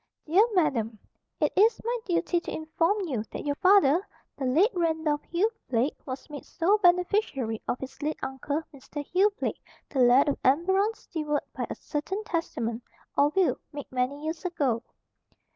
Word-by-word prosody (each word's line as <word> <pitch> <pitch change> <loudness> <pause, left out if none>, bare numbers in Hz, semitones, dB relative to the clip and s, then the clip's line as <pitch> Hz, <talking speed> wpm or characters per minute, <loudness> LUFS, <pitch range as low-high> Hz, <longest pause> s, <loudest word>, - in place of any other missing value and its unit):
"Dear 355 +7 +5
Madam: 235 - +1 0.4
It 300 - +1
is 440 +4 +4
my 475 +2 0
duty 345 -1 +1
to - - -7
inform 330 +6 0
you 265 - -2
that - - -6
your 290 - +1
father 370 -4 +5 0.3
(the 275 - -4
late 330 - +4
Randolph 320 -4 0
Hugh 380 +6 +1 0.2
Blake) 250 +3 +1
was 260 +1 -6
made 295 -2 -8
sole 390 +6 +1
beneficiary 355 - +2
of - - 0
his 265 +2 -9
late 305 +1 -1
uncle, 270 +4 -2
Mr. 285 +1 -7
Hugh 380 +7 +3
Blake, - - -2 0.3
the 275 - -2
Laird 250 +3 +6
of 285 - 0
Emberon's 380 +10 +3
steward, 300 -3 -2
by - - -3
a - - -4
certain 380 +8 -4
testament, 240 - -3 0.3
or 285 - +5
will, 380 -3 +2
made 285 -2 -8
many 260 +3 -1
years 320 +2 -4
ago. 285 -10 0
310 Hz, 165 wpm, -27 LUFS, 270-360 Hz, 0.4 s, Laird